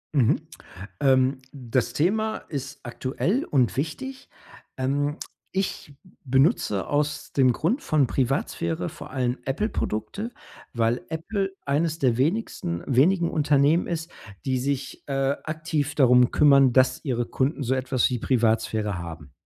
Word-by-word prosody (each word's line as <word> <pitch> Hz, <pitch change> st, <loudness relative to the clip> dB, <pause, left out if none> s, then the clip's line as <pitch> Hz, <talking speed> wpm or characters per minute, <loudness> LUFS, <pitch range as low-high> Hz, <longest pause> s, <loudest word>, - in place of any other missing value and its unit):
Mhm. 125 Hz, -5 st, +2 dB, 0.5 s
Ähm, 130 Hz, -1 st, +3 dB
das 125 Hz, -2 st, -1 dB
Thema 215 Hz, +9 st, +1 dB
ist 140 Hz, -3 st, -5 dB
aktuell 135 Hz, -, -1 dB
und 125 Hz, -9 st, +1 dB
wichtig. 260 Hz, -, -4 dB, 0.5 s
Ähm, 145 Hz, +3 st, 0 dB, 0.3 s
ich 190 Hz, -6 st, -3 dB
b 185 Hz, -, -20 dB, 0.2 s
benutze 130 Hz, -, +2 dB
aus 150 Hz, 0 st, -1 dB
dem 130 Hz, -3 st, +4 dB
Grund 215 Hz, -, 0 dB
von 150 Hz, -4 st, +2 dB
Privatsphäre 120 Hz, -, -1 dB
vor -, -, -11 dB
allen 125 Hz, -1 st, -1 dB
Apple-Produkte, 180 Hz, -, -2 dB, 0.4 s
weil 115 Hz, 0 st, +1 dB
Apple 195 Hz, +5 st, -2 dB
eines 155 Hz, +3 st, 0 dB
der 125 Hz, -5 st, +2 dB
wenigsten 135 Hz, -, -1 dB
wenigen 170 Hz, +7 st, +3 dB
Unternehmen 150 Hz, +2 st, +3 dB
ist, 165 Hz, -1 st, -3 dB, 0.4 s
die 130 Hz, -1 st, +1 dB
sich, 135 Hz, +1 st, -3 dB
äh, 135 Hz, 0 st, 0 dB
aktiv 155 Hz, -2 st, -2 dB
darum 125 Hz, -3 st, +5 dB
kümmern, 140 Hz, -3 st, +6 dB
dass 130 Hz, 0 st, +3 dB
ihre 120 Hz, -3 st, 0 dB
Kunden 140 Hz, +5 st, -1 dB
so 130 Hz, +2 st, +1 dB
etwas 130 Hz, -1 st, +1 dB
wie 125 Hz, -2 st, -2 dB
Privatsphäre 110 Hz, -4 st, +1 dB
haben. 80 Hz, -4 st, -8 dB
135 Hz, 130 wpm, -25 LUFS, 125-155 Hz, 0.5 s, kümmern